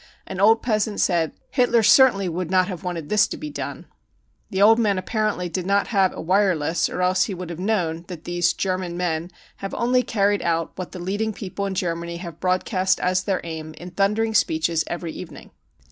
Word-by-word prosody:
An 185 - -6
old 225 +3 +5
peasant 215 -3 0
said: 170 -4 +1
5 - - -36
Hitler 240 -3 +3
certainly 210 -4 +5
would 175 0 -3
not 185 0 +3
have 185 -1 -6
wanted 170 -4 -4
this 210 +1 +4
to - - -6
be 305 -1 -6
done. - - -5
5 - - -29 0.6
The 190 - -1
old 225 +2 +6
man 205 -4 +2
apparently 210 -1 -1
did 180 +1 -4
not 200 0 +2
have 195 -4 +3
a - - -6
wireless, 175 -3 +1
or 180 - -2
else 185 +1 +3
he 200 - -4
would 180 -1 -6
have 170 - -7
known 175 -5 -1
that 175 -4 -8
these 175 0 +1
e - - -9
German 185 -2 -2
men 170 -2 -1
5 - - -29 0.2
have 195 - -6
enly 250 +1 +1
carried 205 -2 +1
out 165 -1 0
what 185 - -6
the - - -8
leading 205 +5 -2
people 200 -1 -4
in 190 - -4
Germany 170 -1 -2
have 170 -2 -8
broadcast 185 +1 +1
as 185 +1 +1
their 195 -3 0
aim 160 -1 -7
in 180 +1 -9
thundering 210 +4 +1
speeches 160 -4 +2
every 170 -1 -4
evening. - - -10
185 Hz, 215 wpm, -23 LUFS, 175-205 Hz, 0.6 s, old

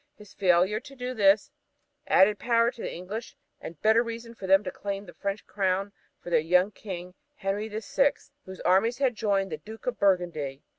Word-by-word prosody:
His 210 -2 -15
failure 185 +2 +3
to 275 +3 -13
do 250 0 -4
this 200 -2 +3 0.6
gave - - +3
added 200 +2 +5
power 235 0 +3
to 240 - -11
the - - -4
English 200 +6 -7 0.2
and 165 - -9
better 220 +2 +5
reason 230 0 -6
for 195 -4 -8
them 195 +2 +5
to - - -4
claim 200 0 -5
the - - -12
French 200 +1 -4
crown 195 0 -1 0.3
for 175 - -9
their 165 - +5
young 180 +5 +3
King, 180 -4 -8 0.2
Henry 200 +2 -2
the 215 0 -5
Sixth, 275 +6 0
whose 190 0 -10
armies 220 +6 +3
had 265 -3 +2
joined 200 -4 0
the 155 - -3
Duke 220 +8 -12
of 250 - -2
Burgundy. 170 -8 0
200 Hz, 200 wpm, -27 LUFS, 185-225 Hz, 0.6 s, added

